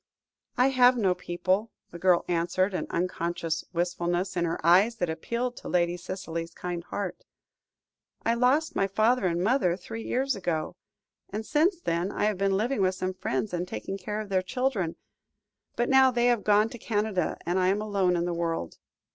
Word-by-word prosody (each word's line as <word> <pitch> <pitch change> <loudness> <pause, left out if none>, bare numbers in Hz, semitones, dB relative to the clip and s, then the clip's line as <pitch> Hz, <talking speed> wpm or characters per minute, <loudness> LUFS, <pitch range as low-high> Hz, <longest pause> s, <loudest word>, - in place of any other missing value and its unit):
"I 255 +2 +5
have 250 -1 +5
no 195 -5 +3
people," 185 +5 -1 0.2
the 170 - -9
girl 180 -1 +3
answered, 175 +3 +1
an - - -2
unconscious 170 -2 -2
wistfulness 175 +1 -1
in 175 -1 +1
her 165 - -2
eyes 190 +7 +5
that 180 -6 -1
appealed 235 +9 -3
to - - -8
Lady 175 -1 +2
Cicely's 170 -2 -6
kind 175 -1 -4
heart. 195 +1 -5 1.0
"I 230 - +3
lost 255 +7 +2
my 195 - +2
father 215 +2 +2
and 175 0 0
mother 200 -6 +2
three 225 +5 -7
years 265 +2 0
ago, 170 -5 -2 0.5
and 215 +2 -4
since 335 - +2
then 175 - -1
I - - -2
have 210 -2 +1
been 195 -1 +2
living 235 +2 0
with 185 0 +2
some 185 0 -2
friends, 185 +2 -2
and 175 +1 -2
taking 195 +1 -5
care 210 +1 -4
of 215 -2 -6
their 190 -1 +2
children. 210 -5 -1 0.8
But 240 - 0
now 265 -1 +6
they 240 -1 +1
have 240 -3 +3
gone 210 +1 +4
to 240 - -9
Canada 205 -6 -1
and 175 +3 +1
I 185 - +2
am 195 +2 +2
alone 200 -4 +1
in 170 0 0
the 175 - -1
world." 165 - -3
190 Hz, 185 wpm, -27 LUFS, 175-225 Hz, 1.0 s, now